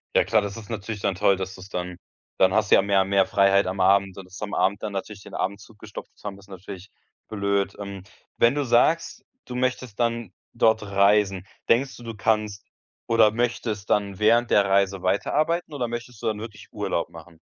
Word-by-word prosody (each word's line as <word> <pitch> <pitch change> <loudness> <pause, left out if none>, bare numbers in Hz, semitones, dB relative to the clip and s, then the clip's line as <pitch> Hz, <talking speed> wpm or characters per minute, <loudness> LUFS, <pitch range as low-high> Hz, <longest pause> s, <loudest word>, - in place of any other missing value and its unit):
Ja - - +4
klar, 110 - +3
das 100 +1 -5
ist 110 -2 -10
natürlich 110 -1 -5
dann 95 - 0
toll, 100 0 +3
dass 95 0 -5
du's 95 +1 -12
dann 90 -2 -4 0.4
dann 95 +1 +4
hast 110 -2 +1
du - - +9
ja - - +5
mehr 100 -1 +2
und 95 - -2
mehr 100 -1 +4
Freiheit 100 -1 +3
am 95 +1 -4
Abend 95 0 +3
und 95 - -8
dass 95 +2 -12
am 105 -1 -4
Abend 100 +2 +1
dann 105 - -3
natürlich 100 +1 -5
den - - -11
Abend 100 +2 -2
zugestopft 105 -1 -11
zu - - -23
haben, 100 -1 -6
ist 100 0 -19
natürlich 95 0 -10 0.4
blöd. 100 -1 -1
Ähm, 100 -2 -7 0.3
wenn 120 +4 +4
du 145 -2 0
sagst, 125 +8 +2 0.2
du 125 - -8
möchtest 125 -3 -2
dann 115 -4 -1 0.2
dort 110 -1 +3
reisen, 100 -1 +2 0.2
denkst 130 +4 +2
du, 120 - -12
du 115 -2 -7
kannst 105 -1 -1 0.4
oder 115 -2 +5
möchtest 115 -3 -2
dann 100 -2 +1
während 115 +2 +4
der 100 -1 +4
Reise 95 -1 +2
weiterarbeiten 155 - 0
oder 125 -4 -2
möchtest 120 -1 -7
du - - -1
dann 110 -1 -1
wirklich 105 -2 -9
Urlaub - - -2
machen? 80 0 -14
100 Hz, 210 wpm, -24 LUFS, 95-115 Hz, 0.4 s, du